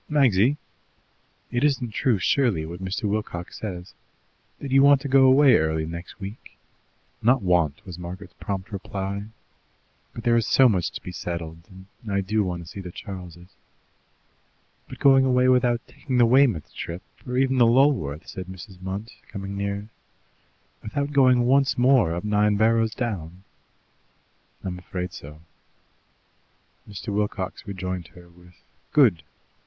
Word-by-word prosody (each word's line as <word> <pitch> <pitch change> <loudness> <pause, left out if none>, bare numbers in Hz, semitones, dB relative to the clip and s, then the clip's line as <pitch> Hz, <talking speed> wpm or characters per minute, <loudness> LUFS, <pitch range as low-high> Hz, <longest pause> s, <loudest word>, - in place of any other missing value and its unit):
"Magsy! 135 -3 +3 0.9
It 120 +2 0
isn't 135 -5 +1
true, 120 -1 +1
surely, 100 - +1
what 85 +3 -8
Mr. 95 +3 -3
Wilcox 100 -4 -3
says, 90 -4 -6 0.6
that 140 - -7
you 135 0 +6
want 140 0 +6
to 140 - -4
go 135 0 +5
away 130 -1 +6
early 80 0 0
next 85 +5 -8
week?" 100 +3 -9 0.6
"Not 120 +1 +3
'want,'" 85 -5 +1
was 90 -2 -9
Margaret's 90 +3 -8
prompt 100 0 -5
reply; 100 0 -4 0.9
"but 115 - -9
there 120 -1 +3
is 115 - +1
so 130 - +6
much 95 -7 +1
to - - -7
be 90 - -6
settled, 85 -1 -6 0.3
and 110 -4 -7
I 100 0 +1
do 105 +3 0
want 90 -2 -4
to - - -15
see 85 - -9
the 90 -2 -7
Charles'." 90 -2 -10 1.4
"But - - -9
going 135 -1 +5
away 125 -1 +3
without 125 -2 +2
taking 130 -4 -4
the 120 - +6
Weymouth 120 - +3
trip, 85 +2 -6 0.2
or 125 0 -2
even 130 0 +2
the 120 - +6
Lulworth?" 120 - +2
said 95 -1 -7
Mrs. 95 0 -11
Munt, 95 +4 -5 0.2
coming 100 -1 -6
nearer. 100 +1 -3 0.9
"Without 140 +7 -3
going 130 -3 +5
once 135 +2 +3
more 120 -9 +4
up 85 - -4
Nine 105 0 +2
Barrows 115 0 +2
Down?" 95 -7 -4 1.2
"I'm 90 -1 -4
afraid 90 0 -5
so." 75 +2 -11 1.5
Mr. 100 +1 -7
Wilcox 105 -1 -3
rejoined 95 -3 -4
her 90 -1 -14
with, 90 0 -20 0.4
"Good! 115 - +5
100 Hz, 150 wpm, -24 LUFS, 90-125 Hz, 1.5 s, you